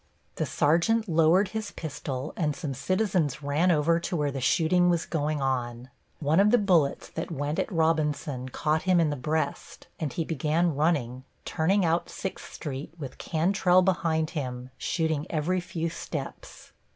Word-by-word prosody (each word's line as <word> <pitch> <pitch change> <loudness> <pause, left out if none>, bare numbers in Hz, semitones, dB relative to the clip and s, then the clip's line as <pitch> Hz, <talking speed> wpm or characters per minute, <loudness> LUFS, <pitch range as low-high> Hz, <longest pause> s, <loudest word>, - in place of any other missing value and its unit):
The - - -1
sergeant 175 +9 +2
lowered 165 +3 +4
his 220 0 -4
pistol 140 -3 -5
and 150 -4 0
some 150 -6 -4
citizens 170 - 0
ran 145 +6 +2
over 165 0 +3
to 175 +2 -3
where 145 -3 0
the 135 -1 -4
shooting 175 +6 +3
was 170 -2 +1
going 150 -2 -1
on. 125 -1 -2 0.3
One 155 +3 +2
of 205 +1 +5
the 245 - +5
bullets 180 -10 +2
that 165 - -5
went 150 -1 -2
at - - -1
Robinson 150 -5 0
caught 155 +4 0
him 185 -2 +3
in 160 -3 +2
the - - -1
breast 150 +2 -3
and 155 -4 -2
he 165 +5 -2
began 160 +2 +1
running, 135 -5 0 0.2
turning 185 +4 +1
out 165 +1 +1
Sixth 190 - -6
Street, 140 -2 -6
with 140 -5 -8
Cantrell 180 +2 +3
behind 165 -4 +1
him, 130 -5 -5
shooting 160 0 -1
every 170 +4 0
few 170 -2 -3
steps. 155 -3 -7
160 Hz, 165 wpm, -27 LUFS, 145-175 Hz, 0.3 s, of